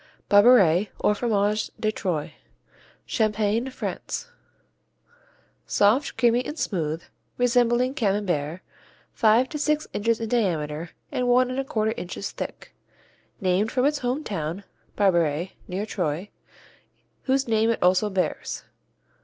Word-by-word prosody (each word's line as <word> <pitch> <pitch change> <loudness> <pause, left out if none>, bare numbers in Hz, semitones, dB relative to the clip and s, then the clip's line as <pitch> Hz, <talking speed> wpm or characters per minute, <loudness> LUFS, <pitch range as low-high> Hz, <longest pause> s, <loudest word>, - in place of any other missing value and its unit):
Barberey, 205 -4 +6
or 210 - +2
Fromage 210 -1 0
de 215 - +1
Troyes 175 -8 -3 0.7
Champagne, 215 +3 0
France - - -5 1.4
Soft, 225 +8 +2
creamy 240 +1 +3
and 300 - -6
smooth, 165 - -2 0.3
resembling 245 +1 +2
Camembert, 185 - -1 0.5
five 230 +2 +4
to 300 - -5
six 300 +1 +1
inches 230 +2 +1
in 225 - -3
diameter 165 -8 -1 0.2
and 250 - -1
1 250 +1 +4
1/4 245 -5 -1
inches 180 +2 -5
thick. - - -7 0.7
Named 190 +2 +1
from 255 0 +1
its 295 0 +1
home 255 +5 -2
town, 175 - -4 0.3
Barberey, 170 -3 +2 0.2
near 190 +3 -3
Troyes, 180 -2 -3 1.0
whose 265 0 +1
name 225 0 +2
it 230 - 0
also 185 +3 +3
bears. 190 -2 -2
215 Hz, 115 wpm, -25 LUFS, 185-245 Hz, 1.4 s, Barberey